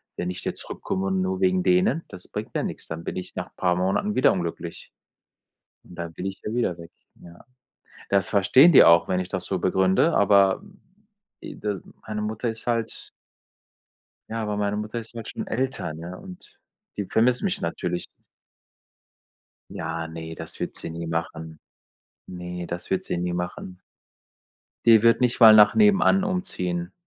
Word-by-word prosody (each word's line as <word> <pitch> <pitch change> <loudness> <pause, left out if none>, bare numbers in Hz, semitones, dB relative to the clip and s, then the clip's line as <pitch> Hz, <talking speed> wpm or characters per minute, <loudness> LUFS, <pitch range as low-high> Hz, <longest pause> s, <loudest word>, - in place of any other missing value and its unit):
wenn 90 - -3
ich 90 - -6
jetzt - - -3
zurückkomme 195 -1 -4
und 190 -1 0
nur 190 0 -2
wegen 185 0 +3
denen, 180 -1 +2
das 90 - -10
bringt - - -6
mir - - 0
nix. - - -6
Dann 80 +1 -6
bin - - -5
ich 90 - -7
nach - - -6
paar 90 -1 +1
Monaten 95 - 0
wieder 130 - +5
unglücklich. 85 -2 -5 0.9
Und - - -14
dann 85 -1 -6
bin 90 - -6
ich 95 0 -5
ja 105 - -3
wieder 105 -8 0
weg, 85 0 -11 0.3
ja. 85 0 -15 0.6
Das 100 -3 +1
verstehen 130 - +6
die - - +9
auch, 85 0 +6
wenn 95 0 0
ich 90 - -5
das 95 -1 -3
so 95 - -2
begründe, 95 - +2
aber, 100 -1 +4
hm, 195 -1 -18 0.6
e - - -8
das 100 -4 -4 0.2
meine 105 -1 -4
Mutter 110 +2 -3
ist 115 0 -6
halt 115 -2 -2 1.2
Ja, 115 0 -3
aber 105 -1 -2
meine 105 0 -1
Mutter 105 +2 -4
ist 115 +1 -9
halt 115 - -7
schon - - -6
älter, 130 -7 -2
ne, 85 +3 -8
und 185 -1 -13 0.4
die 100 -2 -3
vermisst 120 +2 +2
mich 195 -3 -2
natürlich. 90 +1 -3 1.7
Ja, 80 0 -4
ne, 80 0 -7
das - - -9
wird - - -4
sie - - -5
nie 85 +1 -6
machen. 80 -1 -5 0.7
Ne, 90 -1 -7
das 85 +1 -6
wird 95 - 0
sie - - -3
nie 90 0 -2
machen. 90 +1 -5 1.1
Die 115 -2 +7
wird 115 0 +5
nicht 125 -2 +1
mal 110 -1 +10
nach 105 -1 +7
nebenan 200 -2 +4
umziehen. 90 - -3
100 Hz, 175 wpm, -24 LUFS, 90-120 Hz, 1.7 s, mal